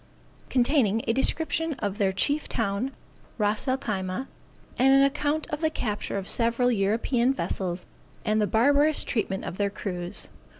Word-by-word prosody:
_Containing 240 -4 +2
a 230 - +3
description 320 +4 +1
of 205 -5 -4
their 195 -2 +3
chief 285 +10 0
town, 220 +2 -1 0.5
Ras 210 +3 0
El 260 0 +2
Khyma, 195 -1 -3 0.5
and 265 +2 +6
an 275 - +6
account 295 +2 0
of 295 +1 -3
the 315 - +2
capture 210 -9 -3
of 195 -1 -4
several 235 +1 +2
European 235 +5 +1
vessels, 180 -7 -3 0.4
and 215 0 +2
the 210 - +2
barbarous 285 +7 +4
treatment 195 -4 -2
of 185 - -6
their 200 0 +2
crews. 180 -2 -4
230 Hz, 155 wpm, -26 LUFS, 200-275 Hz, 0.5 s, and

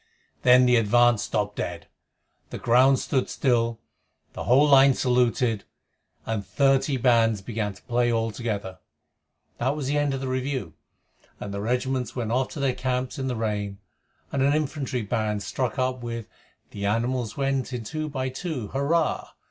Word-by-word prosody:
Then 125 0 +6
the 125 -1 +5
advance 120 0 +4
stopped 105 -1 -2
dead, - - -4 0.6
the - - -6
ground 130 +3 +4
stood 130 0 -1
still, 115 -3 +1 0.5
the - - -6
whole 135 +5 +5
line 135 -1 +6
saluted, 125 -3 +1 0.6
and 110 -2 -2
thirty 135 +4 +2
bands 115 -4 +3
began 105 -3 -3
to - - -18
play 120 0 +1
all 115 -1 0
together. 105 -5 -4 0.8
That 130 +4 0
was 150 -3 -4
the 145 +2 +1
end 145 -2 0
of - - -4
the 135 - -4
review, 130 - -2 0.7
and 100 - -6
the 100 - -3
regiments 125 +1 -1
went 115 -3 -2
off 130 +2 +1
to - - -6
their 135 -2 +1
camps 125 +1 -2
in 130 - -2
the 125 - -1
rain, 105 -3 -2 0.5
and 140 - -1
an 140 +2 +3
infantry 140 -5 -2
band 105 0 -1
struck 125 +1 -2
up 130 -1 -1
with 115 -2 -5 0.4
The 100 -1 -3
animals 115 +2 -1
went 135 -1 -1
in 125 -2 -4
two 155 +6 -4
by 130 -2 -2
two, 130 - -5
Hurrah! 150 +4 0
125 Hz, 165 wpm, -25 LUFS, 115-135 Hz, 0.8 s, Then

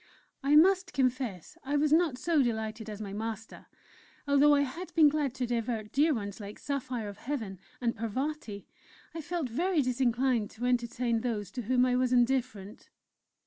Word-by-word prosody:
I 285 +1 +3
must 370 +3 +5
confess 255 - -2
I 285 +2 0
was 300 +1 +2
not 320 -6 +3
so 320 +1 +2
delighted 220 -2 -2
as 215 0 -6
my 195 -1 -6
master. 220 +1 -6 0.6
Although 285 +1 +5
I 285 - +3
had 285 +7 -4
been 310 -3 +7
glad 285 -4 -1
to 255 - -1
divert 230 -2 -2
dear 300 +4 +3
ones 205 -6 -3
like 205 0 -8
Saphire 260 -5 -3
of 200 -1 -8
Heaven 225 -9 -4 0.2
and 235 -2 -1
Parvati, 230 -1 -4 0.5
I 325 - -5
felt 335 -2 -3
very 320 +6 +1
disinclined 250 -2 +1
to 245 - -3
entertain 240 -1 0
those 210 -5 -3
to 245 - -4
whom 250 +2 +2
I 250 -1 +1
was 255 -1 +1
indifferent. 245 -5 0
250 Hz, 170 wpm, -30 LUFS, 225-285 Hz, 0.6 s, been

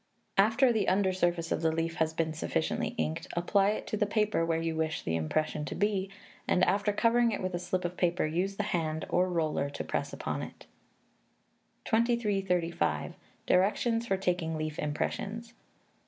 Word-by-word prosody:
After 235 +5 +5
the 215 -3 +1
under 190 0 +2
surface 175 -2 0
of - - 0
the 160 -1 +2
leaf 165 +1 -2
has 160 -2 +1
been 160 0 -1
sufficiently 80 - -1
inked, 80 0 -2
apply 195 +3 +2
it 215 - -2
to 215 - -3
the 210 - +1
paper 210 -4 +1
where 165 -1 +1
you 165 0 -2
wish 160 -2 -1
the 80 - -1
impression 150 - -1
to - - -5
be; 200 -2 0 0.4
and, 180 - +3
after 200 +2 +2
covering 235 +2 +3
it 210 - -2
with 185 -1 -3
a 175 - -1
slip 180 +1 -2
of 175 +1 -3
paper, 175 -1 +1
use 180 +5 -1
the 210 - -1
hand 160 -6 -1
or 180 +1 +2
roller 155 -5 0
to 140 - -5
press - - -2
upon - - -3
it. - - -9 1.2
2335. 205 -7 +1 0.3
Directions 225 +5 +2
for 195 - +1
Taking 175 -4 -1
Leaf 155 -1 -4
Impressions. 210 +10 -3
180 Hz, 175 wpm, -30 LUFS, 160-205 Hz, 1.2 s, After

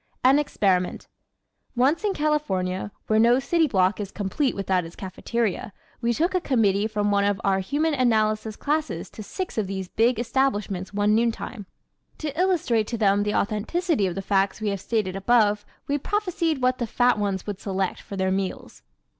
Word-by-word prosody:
An 265 +3 +6
Experiment 190 -10 0 0.7
¶ - - -44
Once 275 - +2
in 405 -2 0
California, 205 -12 -1
where 215 0 +2
no 235 +2 +5
city 320 +4 +2
block 190 -5 +2
is 200 -2 -4
complete 215 +8 -1
without 190 -2 0
its 165 +1 -10
cafeteria, 205 +2 -3 0.3
we 235 0 +1
took 330 +10 0
a 365 - +1
committee 215 -7 +2
from 210 -1 0
one 200 0 +3
of 200 -1 +1
our 195 -1 +2
Human 295 +11 0
Analysis 220 -4 +1
classes 295 - -2
to - - -9
six 350 - -4
of 205 - -1
these 190 -1 -4
big 230 +2 +2
establishments 215 -6 -1
one 205 +1 +2
noontime. 225 -2 -1 0.5
To 300 -2 -4
illustrate 315 - +1
to 235 - -3
them 200 -2 +3
the 210 0 -1
authenticity 225 - 0
of 175 - -4
the 195 - -4
facts 195 +1 +1
we 215 -1 -1
have 200 -2 -3
stated 210 -5 -1
above 210 0 +2 0.2
we 285 +1 0
prophesied 340 -6 -1
what 255 +1 +2
the 240 - -1
fat 245 0 +2
ones 195 -3 -1
would 205 -2 -5
select 190 -2 -2
for 200 - -8
their 190 0 +1
meals. 190 0 -4
215 Hz, 180 wpm, -25 LUFS, 195-265 Hz, 0.7 s, An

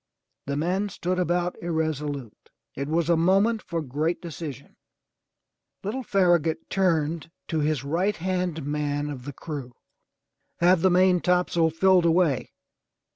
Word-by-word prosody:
The 140 0 -1
men 185 +6 0
stood 180 -1 -2
about 175 0 -1
irresolute. 150 -7 -3 0.2
It 140 +1 -4
was 165 +1 0
a 170 - +4
moment 195 +7 +3
for 165 -2 -4
great 150 +5 -1
decision. 160 -5 -8 1.1
Little 220 +7 -3
Farragut 175 - +1
turned 165 -4 +1 0.2
to 160 - 0
his 150 -3 0
right 175 +8 0
hand 180 -3 -2
man 145 0 -2
of 130 -3 -8
the 145 - -6
crew. 140 -4 -7 0.8
"Have 175 0 +4
the 190 - +5
maintopsail 180 -2 +3
filled 180 +2 +4
away!" 165 -6 +2
165 Hz, 130 wpm, -25 LUFS, 150-180 Hz, 1.1 s, the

